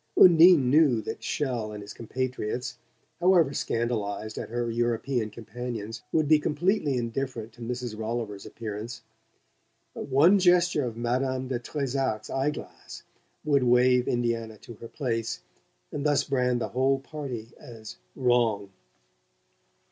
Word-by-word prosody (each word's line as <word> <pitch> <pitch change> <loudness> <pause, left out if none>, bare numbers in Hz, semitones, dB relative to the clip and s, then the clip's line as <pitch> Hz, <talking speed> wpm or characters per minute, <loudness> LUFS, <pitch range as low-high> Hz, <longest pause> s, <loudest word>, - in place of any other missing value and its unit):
Undine 165 -6 +7
knew 145 -6 +5
that - - -5
Chelles 120 -7 -2
and 105 - -7
his 100 - -9
compatriots, 125 +1 -4 0.4
however 175 -6 +4
scandalized 110 -4 -2
at - - -6
her 120 0 -2
European 120 0 -1
companions, 115 0 -6
would 155 -2 +2
be 155 0 +5
completely 150 -2 0
indifferent 120 -1 -4
to 120 - -16
Mrs. 120 -1 -4
Rolliver's 110 -2 -4
appearance; 110 +1 -7 0.9
but - - -6
one 155 +9 +5
gesture 175 -5 +3
of 115 -2 -5
Madame 130 +2 -1
de 125 -2 -1
Trezac's 135 -4 -2
eye 135 +2 +1
glass 150 - -9 0.4
would 145 -2 +3
wave 125 0 +4
Indiana 115 -2 -1
to 120 - -12
her 115 +1 -10
place 115 - -3 0.5
and 140 - -4
thus 145 -2 +2
brand 125 -3 0
the - - -2
whole 135 +2 +2
party 135 -5 -7
as 110 -2 -11 0.2
"wrong." 115 -6 +1
125 Hz, 135 wpm, -27 LUFS, 115-135 Hz, 0.9 s, Undine